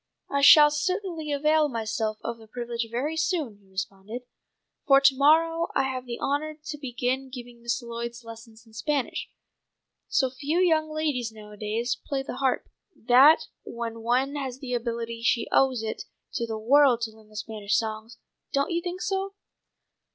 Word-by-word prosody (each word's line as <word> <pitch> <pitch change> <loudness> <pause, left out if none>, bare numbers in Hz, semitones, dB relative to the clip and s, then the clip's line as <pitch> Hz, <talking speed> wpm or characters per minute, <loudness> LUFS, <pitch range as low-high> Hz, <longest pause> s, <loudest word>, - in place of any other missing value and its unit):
"I 280 0 +1
shall 295 +1 +9
certainly 335 0 -2
avail 300 +1 +3
myself 220 -2 -2
of 230 0 -4
the 220 - -15
privilege 235 0 -4
very 265 +7 -2
soon," 320 - -1
he 195 - -25
responded, 195 +5 -6 0.6
"for 275 -1 +7
to 275 -1 +5
morrow 330 +4 +4
I - - +3
have 255 -1 -3
the 235 - -5
honour 300 +2 -1
to 305 0 -8
begin 260 0 -2
giving 245 -2 -10
Miss 235 +1 -2
Lloyd 235 0 -5
lessons 230 0 -12
in 225 - -21
Spanish. 265 +5 -2 0.8
So 260 -2 +1
few 285 +5 -2
young 320 -4 +3
ladies 295 -7 -1
nowadays 215 +2 -3
play 270 -1 -2
the 255 - -6
harp, 265 -1 0 0.3
that 260 +7 +6 0.2
when 230 -1 -6
one 250 +4 +1
has 265 -3 -4
the 260 -2 -6
ability 230 -1 -3
she 230 0 +1
owes 260 -4 +3
it 220 - -4 0.3
to 235 -2 -2
the 220 -1 -3
world 250 +2 +4
to 230 -1 -2
learn 215 -1 -19
the 215 - -18
Spanish 215 -1 -1
songs. 220 +1 -4 0.3
Don't 280 +3 0
you 340 0 0
think 360 +1 -5
so?" 390 0 -2
250 Hz, 165 wpm, -26 LUFS, 230-295 Hz, 0.8 s, shall